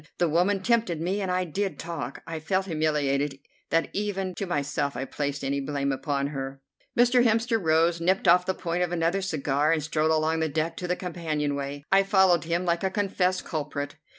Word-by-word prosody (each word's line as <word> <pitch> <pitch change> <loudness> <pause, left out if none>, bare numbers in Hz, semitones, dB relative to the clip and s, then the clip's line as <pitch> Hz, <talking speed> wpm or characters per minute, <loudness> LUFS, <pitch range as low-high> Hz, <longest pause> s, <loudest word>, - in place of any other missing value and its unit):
The 175 - +2
woman 185 +5 +2
tempted 225 -7 +1
me, 185 +5 -1
and 190 - -2
I 180 0 +1
did 190 +3 -2
talk. 165 -6 -6
I 165 -1 -5
felt 185 +4 0
humiliated 150 -4 0 0.3
that 165 - +1
even 195 -2 -2
to 195 - -4
myself 140 -4 -1
I 135 - -2
placed 140 0 -3
any 140 +1 0
blame 140 0 -1
upon 140 +1 -1
her. 135 -1 -5 0.4
Mr. 245 +1 +5
Hemster 225 -1 +2
rose, 165 +1 +3
nipped 185 +3 +1
off 180 +1 +5
the 190 - 0
point 175 0 -2
of 175 -1 0
another 175 +3 +1
cigar, 150 -4 0
and 160 -2 +1
strode 155 +1 +1
along 160 +1 +2
the 160 0 0
deck 155 +3 -1
to 180 - -4
the 180 - +1
companion 160 -5 -2
way, 140 0 -4
I 195 0 +6
following 190 -4 +4
him 170 +3 -1
like 170 0 0
a 190 - +2
confessed 185 -2 0
culprit. 145 -2 -4
165 Hz, 200 wpm, -26 LUFS, 145-185 Hz, 0.4 s, I